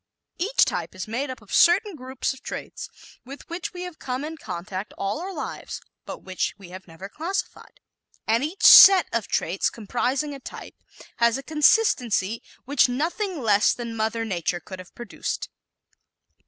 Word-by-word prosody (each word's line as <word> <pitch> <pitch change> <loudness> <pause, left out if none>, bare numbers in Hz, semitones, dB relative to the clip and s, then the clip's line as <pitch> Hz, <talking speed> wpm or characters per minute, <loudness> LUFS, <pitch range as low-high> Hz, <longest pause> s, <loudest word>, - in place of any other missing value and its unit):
Each 425 +8 +3
type - - -4
is 185 +2 -6
made 255 +6 -3
up 255 -4 -8
of 200 - -12
certain 380 +3 +4
groups 260 -1 -3
of 265 - -15
traits - - -7 0.3
with 275 +3 -11
which 340 +2 -4
we 360 -1 -7
have 360 -3 -9
come 255 +2 -4
in 320 +1 -6
contact 190 - -6
all 195 +5 -2
our 380 +2 -5
lives 325 - -6 0.3
but - - -8
which 185 -1 -3
we 195 -3 -13
have 185 +1 -11
never 165 +3 -10
classified; 365 - -5 0.5
and 230 +4 +1
each 350 +8 -5
"set" 385 -2 +10
of 230 -3 -1
traits 175 +4 0
comprising 250 +6 -2
a 275 - -8
type - - -10 0.4
has 235 0 +3
a 270 - -8
consistency 250 - +2 0.2
which 270 -1 +3
nothing 330 - -2
less 210 -1 +4
than 235 -2 -6
Mother 225 +1 -1
Nature 175 -3 -2
could 185 +2 -10
have 185 - -13
produced. 240 -3 -5
250 Hz, 170 wpm, -24 LUFS, 205-315 Hz, 0.5 s, set